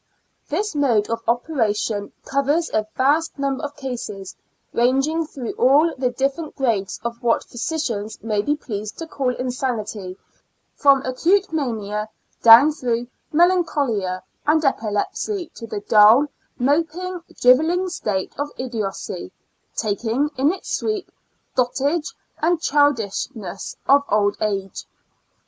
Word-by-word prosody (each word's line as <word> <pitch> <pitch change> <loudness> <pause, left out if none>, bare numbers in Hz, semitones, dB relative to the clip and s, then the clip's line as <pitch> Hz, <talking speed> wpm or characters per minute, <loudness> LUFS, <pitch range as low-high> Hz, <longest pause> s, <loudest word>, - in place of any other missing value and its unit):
This 405 +7 -1
mode 240 -8 +2
of 230 0 -1
operation 225 -5 0
covers 285 +5 0
a 215 0 +1
vast 295 +6 +2
number 275 +1 -2
of 290 0 -5
cases, 220 -7 -6 0.4
ranging 270 +7 +2
through 260 -6 -5
all 290 +6 +5
the 255 -1 0
different 275 +5 -2
grades 225 -8 -1
of 235 0 -4
what 235 -2 +2
physicians 235 -6 -3
may 215 -2 0
be 290 +7 0
pleased 215 -7 -6
to 330 - -5
call 265 -5 -2
insanity, 225 -7 -3 0.6
from 275 -1 +4
acute 335 +9 +1
mania 215 -7 -2 0.3
down 235 +6 +9
through 245 -5 -2 0.2
melancholia 285 - +1 0.2
and 310 +1 +3
epilepsy 270 - -1
to 230 - -9
the 210 -2 -4
dull, 215 +7 +6 0.3
moping, 330 +7 0 0.2
driveling 320 +9 +4
state 205 - -3
of 290 0 -1
idiocy, 225 -6 -4 0.4
taking, 230 +7 0
in 275 +4 +3
its 380 - -4
sweep, 430 -3 -3 0.4
dotage 280 +5 0 0.3
and 340 +1 +2
childish 285 - +1
ness 195 -3 -7
of 280 +1 +6
old 205 -1 +2
age. 195 -3 -2
255 Hz, 120 wpm, -22 LUFS, 215-300 Hz, 0.6 s, down